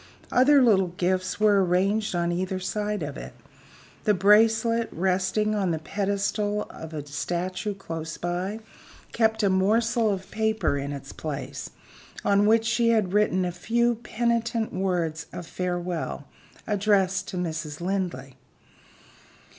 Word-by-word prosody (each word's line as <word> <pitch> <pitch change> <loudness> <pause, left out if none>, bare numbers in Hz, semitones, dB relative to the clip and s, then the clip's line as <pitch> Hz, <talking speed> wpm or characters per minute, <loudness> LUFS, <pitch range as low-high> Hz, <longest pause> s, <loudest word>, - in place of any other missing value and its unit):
Other 275 +2 +5
little 195 -6 +4
gifts 185 +2 -1
were 205 -2 +4
arranged 195 +3 +1
on 170 0 0
either 185 +2 -2
side 210 0 -2
of 145 - -5
it. - - -8 0.7
The 210 - +4
bracelet, 225 +4 +4
resting 190 +4 0
on 200 -3 0
the 165 - 0
pedestal 205 +4 -1
of 160 0 -9
a 150 -2 -5
statue 180 +7 -3
close 165 -4 -6
by, 180 +6 -3 0.5
kept 220 -1 +1
a 200 - +4
morsel 225 +4 +2
of 190 -2 -3
paper 220 -7 0
in 140 0 -3
its 140 -2 -7
place - - -5 0.6
on 200 +1 +4
which 225 +1 +4
she 235 0 +2
had 215 -5 +2
written 205 -3 +2
a 175 - -1
few 235 +7 +1
penitent 235 0 -1
words 175 -4 -1
of 175 - -7
farewell 175 -1 -3 0.4
addressed 195 -2 +1
to 185 - -5
Mrs. 155 -3 -4
Linley. 170 -8 -3
195 Hz, 135 wpm, -26 LUFS, 175-215 Hz, 0.7 s, Other